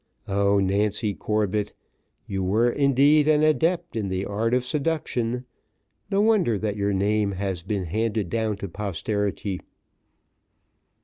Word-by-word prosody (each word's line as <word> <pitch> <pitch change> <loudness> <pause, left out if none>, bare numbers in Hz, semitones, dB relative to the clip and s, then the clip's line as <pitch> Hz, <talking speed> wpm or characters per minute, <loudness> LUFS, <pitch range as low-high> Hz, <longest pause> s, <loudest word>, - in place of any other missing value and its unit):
Oh! 100 0 +2
Nancy 100 +2 +1
Corbett! 105 0 -1 0.5
you 95 -1 -3
were, 110 +6 +2
indeed, 140 +3 +4
an 155 -1 +4
adept 160 +1 +1
in 105 -4 -2
the 95 +1 -2
art 115 +4 0
of 125 0 0
seduction 130 -4 -1 0.6
no 200 0 +2
wonder 205 - +3
that 105 0 -2
your 100 0 0
name 100 +1 +1
has 95 -2 -3
been 95 +1 -3
handed 110 +2 -1
down 110 +2 -1
to 100 - -5
posterity. 100 0 -3
105 Hz, 130 wpm, -25 LUFS, 100-125 Hz, 0.6 s, indeed